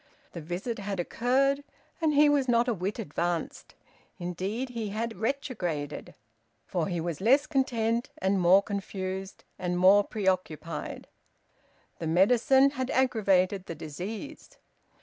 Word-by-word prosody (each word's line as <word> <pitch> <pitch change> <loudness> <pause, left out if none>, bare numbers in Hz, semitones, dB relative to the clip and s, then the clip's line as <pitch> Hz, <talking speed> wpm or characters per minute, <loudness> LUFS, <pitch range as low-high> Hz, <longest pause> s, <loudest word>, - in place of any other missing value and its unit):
The 170 - -7
visit 180 +9 -4
had 200 -1 -4
occurred, 270 +9 +1 0.4
and 310 -2 +2
he 295 +1 +6
was 285 -2 +2
not 240 0 +3
a 240 - +2
whit 195 +1 -3
advanced; 175 -4 -3 0.4
indeed 190 +8 -3
he 230 -4 -4
had 225 +3 -3
retrograded, 185 - -3 0.5
for 175 -4 -1
he 175 -3 -2
was 165 -1 -4
less 270 +8 +4
content 240 -5 0
and 190 -6 +1
more 185 +3 +6
confused, 190 -2 -5 0.2
and 180 -1 -1
more 195 +3 +6
preoccupied. 185 -7 -3 0.9
The 165 - -3
medicine 245 +10 +4
had 260 -2 -3
aggravated 195 -7 +2
the 165 - -5
disease. 175 - -7
200 Hz, 130 wpm, -28 LUFS, 180-245 Hz, 0.9 s, he